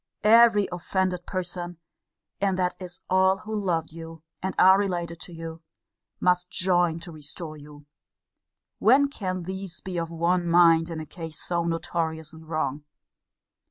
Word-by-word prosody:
Every 225 Hz, -1 st, +6 dB
offended 180 Hz, 0 st, -2 dB
person 175 Hz, -2 st, -4 dB, 0.6 s
(and 195 Hz, -2 st, +1 dB
that 180 Hz, -1 st, +1 dB
is 180 Hz, -1 st, -9 dB
all 190 Hz, +1 st, +3 dB
who 215 Hz, +3 st, -8 dB
loved 175 Hz, -7 st, -1 dB
you, 165 Hz, -1 st, -10 dB, 0.2 s
and 190 Hz, +1 st, -3 dB
are 190 Hz, +1 st, +7 dB
related 175 Hz, -4 st, -2 dB
to 175 Hz, -, -9 dB
you) 165 Hz, -1 st, -8 dB, 0.6 s
must 180 Hz, 0 st, +2 dB
join 175 Hz, -3 st, +1 dB
to 170 Hz, -, -9 dB
restore 155 Hz, +1 st, -7 dB
you: 145 Hz, -1 st, -13 dB, 0.9 s
when 270 Hz, +6 st, +5 dB
can 185 Hz, -9 st, -4 dB
these 190 Hz, -1 st, -6 dB
be 180 Hz, -2 st, -4 dB
of 165 Hz, -1 st, -3 dB
one 170 Hz, +1 st, 0 dB
mind 165 Hz, -1 st, +5 dB
in 165 Hz, -1 st, -4 dB
a 155 Hz, -, -6 dB
case 160 Hz, 0 st, -7 dB
so 170 Hz, -1 st, -1 dB
notoriously 160 Hz, -1 st, -3 dB
wrong? 155 Hz, -3 st, -2 dB
175 Hz, 145 wpm, -26 LUFS, 165-185 Hz, 0.9 s, are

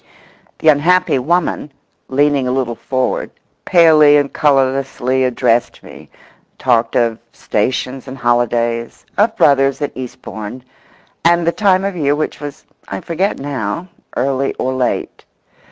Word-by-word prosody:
The 160 Hz, -, +3 dB
unhappy 155 Hz, 0 st, +3 dB
woman, 160 Hz, +1 st, -1 dB, 0.4 s
leaning 140 Hz, -1 st, +1 dB
a -, -, 0 dB
little 130 Hz, -2 st, -1 dB
forward, 130 Hz, +2 st, -2 dB, 0.4 s
palely 155 Hz, -4 st, +6 dB
and 145 Hz, -1 st, -1 dB
colourlessly 135 Hz, -2 st, +1 dB
addressed 120 Hz, -1 st, 0 dB
me—talked 115 Hz, 0 st, -4 dB
of 115 Hz, -2 st, +1 dB
stations 125 Hz, +5 st, -2 dB
and 130 Hz, +1 st, -7 dB
holidays, 120 Hz, -1 st, 0 dB
of 220 Hz, +2 st, +2 dB
brothers 135 Hz, -1 st, +3 dB
at 145 Hz, -, -2 dB
Eastbourne, 120 Hz, -2 st, -8 dB, 0.6 s
and 170 Hz, 0 st, +3 dB
the 170 Hz, -, +3 dB
time 195 Hz, -1 st, +2 dB
of 200 Hz, -1 st, -2 dB
year, 145 Hz, -3 st, +1 dB
which 155 Hz, -, -3 dB
was, 145 Hz, -1 st, -8 dB, 0.2 s
I 95 Hz, -, -4 dB
forget 180 Hz, +5 st, -2 dB
now, 135 Hz, -, -4 dB, 0.3 s
early 135 Hz, +1 st, 0 dB
or 130 Hz, -, -2 dB
late. 130 Hz, -1 st, -2 dB
135 Hz, 125 wpm, -16 LUFS, 125-155 Hz, 0.6 s, palely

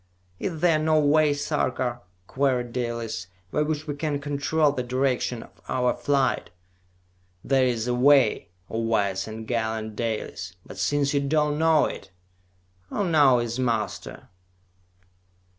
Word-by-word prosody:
"Is 165 Hz, -5 st, -4 dB
there 165 Hz, -3 st, +4 dB
no 155 Hz, 0 st, +3 dB
way, 150 Hz, +1 st, +4 dB
Sarka," 130 Hz, -4 st, -1 dB, 0.2 s
queried 125 Hz, -1 st, 0 dB
Dalis, 115 Hz, -6 st, -3 dB, 0.2 s
"by 150 Hz, -, +1 dB
which 150 Hz, 0 st, -1 dB
we 150 Hz, -, -3 dB
can 145 Hz, 0 st, -2 dB
control 145 Hz, +1 st, +1 dB
the 130 Hz, -, -3 dB
direction 125 Hz, -1 st, -1 dB
of -, -, -20 dB
our 125 Hz, -1 st, +1 dB
flight!" 135 Hz, +2 st, 0 dB, 0.9 s
"There 135 Hz, -1 st, +3 dB
is 120 Hz, -2 st, -1 dB
a 125 Hz, -, +1 dB
way, 130 Hz, -5 st, +4 dB, 0.2 s
O 115 Hz, -, -3 dB
wise 100 Hz, -4 st, 0 dB
and 110 Hz, 0 st, -7 dB
gallant 110 Hz, -2 st, -2 dB
Dalis! 105 Hz, -5 st, -4 dB
But 95 Hz, -, -10 dB
since 140 Hz, +8 st, +1 dB
you 140 Hz, -, +3 dB
do 140 Hz, +2 st, -1 dB
not 150 Hz, -1 st, +3 dB
know 160 Hz, 0 st, +3 dB
it, 95 Hz, -, -6 dB, 0.8 s
who 200 Hz, -, -1 dB
now 145 Hz, -6 st, +5 dB
is 120 Hz, +1 st, -2 dB
master?" 115 Hz, -5 st, -2 dB
130 Hz, 140 wpm, -25 LUFS, 115-145 Hz, 0.9 s, now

